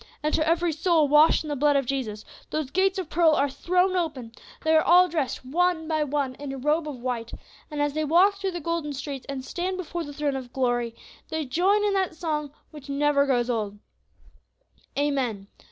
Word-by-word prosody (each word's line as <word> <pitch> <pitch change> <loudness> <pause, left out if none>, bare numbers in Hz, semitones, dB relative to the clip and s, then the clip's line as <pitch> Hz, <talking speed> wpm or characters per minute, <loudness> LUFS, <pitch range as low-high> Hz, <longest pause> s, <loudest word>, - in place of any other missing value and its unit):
And 305 - 0
to 310 0 +1
every 335 0 +2
soul 325 -1 +2
washed 300 +3 +5
in - - -8
the 295 - -2
blood 290 +1 +3
of 275 -2 +2
Jesus 235 -5 -3 0.2
those 305 -4 -3
gates 385 +1 +2
of 375 -4 -3
pearl 325 0 +3
are 285 - +2
thrown 360 +6 +1
open; 295 -10 -2 0.3
they 315 0 +3
are 315 - +6
all 360 +2 +6
dressed 305 -6 -3
one 335 +3 +1
by 310 -2 +1
one 280 -2 -1
in 285 -1 -5
a 270 - -5
robe 300 +4 0
of 290 - -5
white, 240 -3 -3 0.4
and 300 -2 -5
as 290 -1 -1
they 310 +1 -1
walk 365 +6 +4
through 390 -1 -1
the 350 - -3
golden 335 -2 -2
streets, 275 -1 -6
and 265 -2 -5
stand 365 +5 -3
before 345 -1 -4
the 290 - -8
throne 290 -1 -2
of 255 -2 -7
glory, 240 -3 0 0.3
they 315 -1 -2
join 375 +10 +2
in 410 -1 +1
that 380 -4 0
song 305 -3 -3 0.2
which 295 -2 -12
never 280 0 +2
grows 245 -3 +1
old: 215 -4 -2 1.2
'Amen. 260 -9 -1
300 Hz, 205 wpm, -25 LUFS, 270-335 Hz, 1.2 s, are